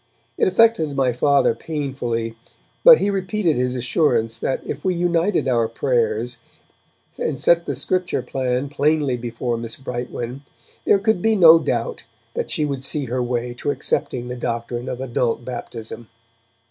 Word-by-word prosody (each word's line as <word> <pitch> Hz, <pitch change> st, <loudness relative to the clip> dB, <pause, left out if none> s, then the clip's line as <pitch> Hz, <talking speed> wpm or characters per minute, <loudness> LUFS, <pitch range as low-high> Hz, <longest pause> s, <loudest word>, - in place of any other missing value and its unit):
It 455 Hz, -, +2 dB
affected 230 Hz, -, +3 dB
my 130 Hz, -2 st, +1 dB
Father 140 Hz, +3 st, +3 dB
painfully, 125 Hz, -7 st, -3 dB, 0.5 s
but -, -, +10 dB
he 205 Hz, -, 0 dB
repeated 190 Hz, -3 st, 0 dB
his 125 Hz, 0 st, 0 dB
assurance 120 Hz, -3 st, +1 dB
that 130 Hz, -, -1 dB
if 145 Hz, -, -5 dB
we 185 Hz, -1 st, +1 dB
united 175 Hz, -1 st, +1 dB
our 120 Hz, -3 st, +2 dB
prayers, 455 Hz, -, -1 dB, 0.8 s
and 485 Hz, -, -2 dB
set 170 Hz, 0 st, +3 dB
the 140 Hz, -, -2 dB
Scripture 175 Hz, +1 st, -1 dB
plan 130 Hz, +1 st, -2 dB
plainly 145 Hz, -1 st, +1 dB
before 120 Hz, 0 st, -3 dB
Miss 115 Hz, 0 st, -6 dB
Brightwen, 125 Hz, -1 st, -5 dB, 0.5 s
there -, -, +6 dB
could 205 Hz, -1 st, +1 dB
be 220 Hz, +2 st, +2 dB
no 165 Hz, -4 st, +8 dB
doubt 485 Hz, -, -3 dB, 0.3 s
that 475 Hz, -, -3 dB
she 155 Hz, -, 0 dB
would 140 Hz, -2 st, -3 dB
see 145 Hz, +1 st, 0 dB
her 125 Hz, +1 st, -2 dB
way 120 Hz, 0 st, -2 dB
to 125 Hz, -, -4 dB
accepting 125 Hz, -3 st, -1 dB
the 125 Hz, -, -5 dB
doctrine 120 Hz, 0 st, -4 dB
of 125 Hz, -, -5 dB
adult 120 Hz, -2 st, -1 dB
baptism. 120 Hz, -2 st, -7 dB
135 Hz, 155 wpm, -21 LUFS, 120-170 Hz, 0.8 s, but